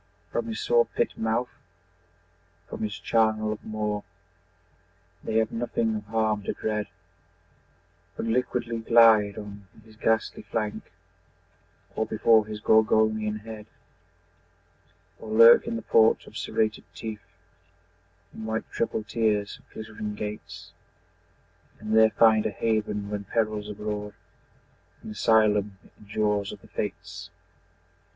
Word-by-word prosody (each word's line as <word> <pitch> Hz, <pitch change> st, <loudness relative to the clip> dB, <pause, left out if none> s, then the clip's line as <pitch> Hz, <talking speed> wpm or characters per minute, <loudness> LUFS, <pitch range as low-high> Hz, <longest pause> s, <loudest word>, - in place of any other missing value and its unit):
From 235 Hz, -, -2 dB
his 225 Hz, -1 st, -4 dB
saw 475 Hz, 0 st, +3 dB
pit 475 Hz, -, -2 dB
mouth, 115 Hz, +2 st, -1 dB, 1.2 s
from -, -, -7 dB
his 105 Hz, -2 st, -3 dB
charnel 110 Hz, -1 st, +1 dB
of 110 Hz, -, -11 dB
maw 105 Hz, -1 st, -3 dB, 1.2 s
The 110 Hz, -, -1 dB
have 110 Hz, -1 st, +1 dB
nothing 115 Hz, -1 st, -1 dB
of 105 Hz, -1 st, -5 dB
harm 110 Hz, -1 st, 0 dB
to -, -, -1 dB
dread, 105 Hz, -1 st, -2 dB, 1.3 s
But -, -, -3 dB
liquidly 120 Hz, 0 st, -1 dB
glide 110 Hz, -3 st, +5 dB
on 100 Hz, -2 st, -9 dB, 0.2 s
his 110 Hz, -1 st, -17 dB
ghastly 110 Hz, 0 st, 0 dB
flank 105 Hz, -2 st, -4 dB, 1.0 s
Or 110 Hz, -, -1 dB
before 110 Hz, 0 st, +3 dB
his 105 Hz, -1 st, -7 dB
Gorgonian 110 Hz, -1 st, +2 dB
head; 110 Hz, -1 st, -9 dB, 1.5 s
Or 110 Hz, -, -9 dB
lurk 115 Hz, +2 st, +7 dB
in -, -, -2 dB
the 115 Hz, -, -5 dB
port 110 Hz, 0 st, +4 dB
of -, -, -15 dB
serrated 110 Hz, -1 st, -1 dB
teeth 110 Hz, -2 st, -6 dB, 1.1 s
In 110 Hz, -, -8 dB
white 110 Hz, 0 st, -2 dB
triple 115 Hz, -1 st, -2 dB
tiers 105 Hz, -1 st, -1 dB
of -, -, -27 dB
glittering 110 Hz, -1 st, -6 dB
gates, 100 Hz, -2 st, -7 dB, 1.1 s
And 110 Hz, +1 st, -2 dB
there 110 Hz, 0 st, +7 dB
find 110 Hz, -1 st, +4 dB
a -, -, -1 dB
haven 105 Hz, -1 st, -2 dB
when 105 Hz, -1 st, -4 dB
peril's 105 Hz, 0 st, -1 dB
abroad, 105 Hz, 0 st, -5 dB, 0.9 s
An -, -, -7 dB
asylum 105 Hz, -2 st, +2 dB, 0.2 s
in 105 Hz, -, -18 dB
jaws 105 Hz, -1 st, 0 dB
of -, -, -11 dB
the -, -, -17 dB
Fates! -, -, -5 dB
110 Hz, 125 wpm, -26 LUFS, 105-110 Hz, 1.5 s, lurk